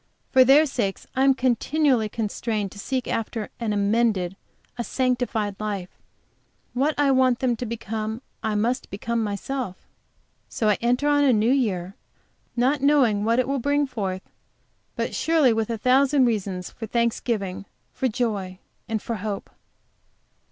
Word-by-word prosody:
For 260 - +7
their 280 +4 +6
sakes 230 -9 -2
I 260 - +2
am 270 -1 +5
continually 255 -1 +1
constrained 215 -2 -2
to 205 - -11
seek 255 +3 -2
after 225 -1 -3
an 230 -3 -1
amended, 205 -3 +1 0.4
a 240 - -3
sanctified 245 -5 -1
life; 200 -4 -4 0.8
what 280 +5 +1
I 285 -1 +3
want 260 -2 +4
them 250 -2 +1
to 245 - -4
become 220 +1 -4 0.2
I 220 -1 -1
must 235 +5 0
become 230 +3 -2
myself. 210 +1 -3 0.7
So 215 - 0
I 210 - +2
enter 250 +5 +1
on 290 0 +4
a 275 - +5
new 220 +1 +3
year, 195 -9 0 0.6
not 260 +4 +2
knowing 255 -8 +3
what 230 +1 +2
it 255 - +2
will 275 0 0
bring 285 +3 +1
forth, 195 -8 -4 0.7
but - - -2
surely 315 -7 +3
with 225 0 -1
a 230 - -2
thousand 265 +3 +4
reasons 195 -6 -2
for 225 - -7
thanksgiving, 215 -4 -1 0.3
for 260 - 0
joy, 210 -6 -2 0.3
and 220 -2 -2
for 230 - -3
hope. 205 0 -5
235 Hz, 150 wpm, -24 LUFS, 210-260 Hz, 0.8 s, For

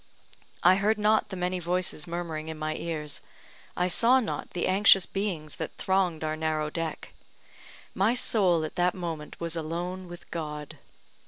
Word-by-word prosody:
I 185 +2 +6
heard 210 +2 +2
not 215 +1 +2
the 190 - -5
many 180 0 -1
voices 175 -2 -1
murmuring 165 -2 -4
in 160 - -6
my 155 0 -2
ears 150 -3 -1 0.6
I 180 - +2
saw 235 +8 +5
not 235 - -4
the 175 - 0
anxious 195 0 +6
beings 180 -7 -3
that - - -5
thronged 185 -4 0
our 155 0 -1
narrow 155 -1 -1
deck 165 -2 -5 0.8
my 210 +6 +2
soul 185 -9 +3
at 155 - -6
that 180 +1 +2
moment 165 -4 -6
was 170 0 -1
alone 175 +3 -4
with 175 0 -12
God. 150 -3 -6
175 Hz, 160 wpm, -28 LUFS, 155-190 Hz, 0.8 s, I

